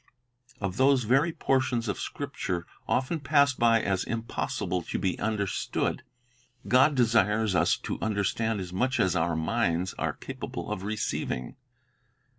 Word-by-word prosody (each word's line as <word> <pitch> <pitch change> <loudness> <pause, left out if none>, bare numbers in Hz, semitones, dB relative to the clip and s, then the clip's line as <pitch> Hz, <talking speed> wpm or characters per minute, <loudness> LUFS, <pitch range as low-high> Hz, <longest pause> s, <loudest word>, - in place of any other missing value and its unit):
Of 100 -1 -3
those 135 0 +4
very 135 +9 +3
portions 130 -6 0
of 100 - -2
Scripture 100 -11 -4 0.2
often 135 +6 0
passed 140 -1 +3
by 115 -1 +4
as 95 -1 0
impossible 115 -5 -2
to - - -4
be 95 -2 -1
understood, 100 -4 -1 0.7
God 130 +4 +5
desires 110 -3 +3
us 85 -1 +3
to - - -3
under 105 -1 0
stand 110 +2 0
as 90 -1 -6
much 130 +7 0
as 95 -1 +2
our 85 -1 +1
minds 85 +1 0
are - - 0
capable - - -6
of - - -3
receiving. 100 - -3
110 Hz, 140 wpm, -28 LUFS, 95-130 Hz, 0.7 s, God